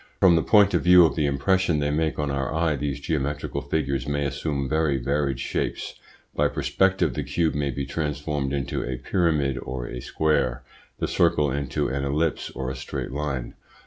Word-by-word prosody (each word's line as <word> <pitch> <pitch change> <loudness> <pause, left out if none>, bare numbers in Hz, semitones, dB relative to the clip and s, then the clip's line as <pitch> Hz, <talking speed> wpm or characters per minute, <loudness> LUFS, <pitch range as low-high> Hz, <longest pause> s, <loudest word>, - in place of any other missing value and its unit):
From 90 -3 +6
the 80 - +3
point 100 +7 +5
of - - +2
view 90 -1 +7
of 80 - 0
the 75 -3 +1
impression 85 +4 +1
they 75 0 0
make 80 +1 0
on 75 -1 -1
our 70 -1 -2
eye 80 -1 +1
these 70 0 -3
geometrical 70 -1 -2
figures 70 -3 -2
may 70 0 -1
assume 70 0 -2
very 75 -1 +1
varied 70 0 -1
shapes. - - -3 0.4
By - - +3
perspective 95 -6 +1
the - - -2
cube 80 -2 0
may 70 -1 -1
be 70 +1 -3
transformed 75 -1 -2
into 70 -2 -2
a 65 0 -3
pyramid 75 -2 0
or 65 -2 -5
a - - -6
square, 65 -4 0 0.3
the - - -1
circle 75 -2 +2
into 70 -2 -1
an 70 +2 -2
ellipse 75 +4 -1
or 65 -1 -4
a - - -5
straight 65 0 -5
line. 70 -3 -3
70 Hz, 185 wpm, -25 LUFS, 70-80 Hz, 0.4 s, view